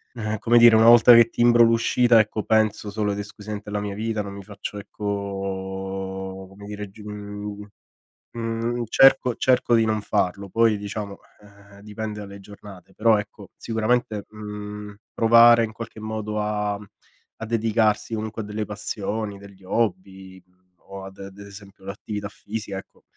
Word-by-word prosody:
ehm 110 -2 -3
come 120 +1 +3
dire, 120 -1 +8
una 110 +1 +6
volta 120 +1 +9
che 115 0 +6
timbro 120 0 +4
l'uscita, 115 0 +4
ecco, 110 0 0
penso 110 -1 +1
solo 105 -1 -1
ed 100 - -5
esclusivamente 105 0 -7
alla 105 0 -2
mia 100 -1 -4
vita, 110 0 -2
non 100 -1 -7
mi 100 -1 -9
faccio 105 +1 -8
ecco, 95 -2 -5
come 100 +1 -13
dire, 105 -1 -7
g 105 - -18
mhmm, 105 0 -7 0.7
mhmm, 115 +1 -3
cerco 135 -1 +5
cerco 125 -2 +2
di 115 -1 +4
non 110 -1 0
farlo, 100 -1 -1
poi, 115 +1 +2
diciamo, 100 0 -6 0.2
ehm, 100 0 -18
dipende 105 0 -6
dalle 100 -1 -10
giornate. 100 -2 -14
Però, 110 -1 +3
ecco, 105 - -9
sicuramente, 110 -1 -1
mhmm, 105 -1 -8 0.2
provare, 115 0 +6
in 110 - -5
qualche 115 -1 -9
modo, 110 -1 -4
a 105 -1 -1 0.6
a - - -1
dedicarsi 110 -1 0
comunque 110 0 -4
a - - -7
delle 105 +1 -4
passioni, 105 0 -4
degli 100 -1 -15
hobby 95 -2 -3 0.4
o, 100 +1 -11
ad 95 0 -9
d'esempio 100 0 -13
l'attività 100 +1 -6
fisica, 105 -1 -6
ecco. - - -14
105 Hz, 155 wpm, -23 LUFS, 100-110 Hz, 0.7 s, volta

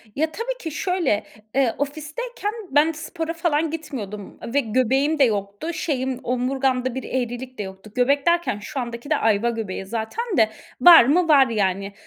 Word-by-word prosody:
Ya, 315 +2 0
tabii - - -4
ki 325 -7 -5
şöyle, 345 - 0 0.3
eee, 260 -4 +2
ofisteyken 310 - -4 0.2
ben 295 +3 +4
spora 325 +1 -5
falan 325 -2 0
gitmiyordum 210 -11 -6 0.2
ve 285 - +4
göbeğim 265 +5 +1
de - - +7
yoktu. 205 +6 -1
Şeyim 265 -6 -2
omurgamda 255 0 0
bir 265 - -4
eğrilik 255 0 -4
de 210 - -3
yoktu. 190 +2 -10
Göbek 275 +3 +2
derken 340 -11 +2
şu 235 +6 -5
andaki 235 +2 -6
de 305 - +3
ayva 220 +1 +2
göbeği 215 -5 -4
zaten 225 - -3
de. 220 -2 +5 0.3
Var 345 -6 +10
mı? 330 +6 +3
Var 280 -4 +6
yani. 200 -3 -1
265 Hz, 165 wpm, -23 LUFS, 225-315 Hz, 0.3 s, Var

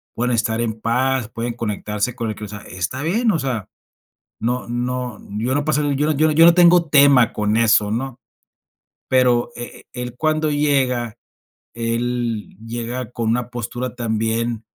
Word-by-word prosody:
pueden 125 +1 0
estar 115 0 0
en 110 -2 -2
paz, 125 +1 0
pueden 120 +1 -4
conectarse 105 0 -3
con 115 -3 -3
el 110 - -4
cre 105 - -7
o - - -7
sea, 105 0 -7
está 95 +9 -4
bien, 220 +8 +2
o 165 - 0
sea, 125 -8 -3 0.7
no 125 +2 -2
no, 125 -1 -3 0.2
yo 120 +4 0
no 145 0 0
pasa, 150 -1 +1
yo 145 +2 +1
no - - +2
yo 155 +2 +5
no 170 - +8
tengo 175 -1 +6
tema 140 -5 +5
con 105 +1 0
eso, 110 -2 +3
¿no? 125 +3 -3 0.9
Pero 125 -2 +3
eh, 120 - -8
eh, - - -26
él 125 -1 -5
cuando 155 +1 +1
llega, 130 -6 +1 0.6
él 115 -1 -2
llega 120 +1 -4
con 115 -2 -1
una 120 0 0
postura 120 +1 -4
también 115 -1 -1
120 Hz, 165 wpm, -20 LUFS, 115-135 Hz, 0.9 s, no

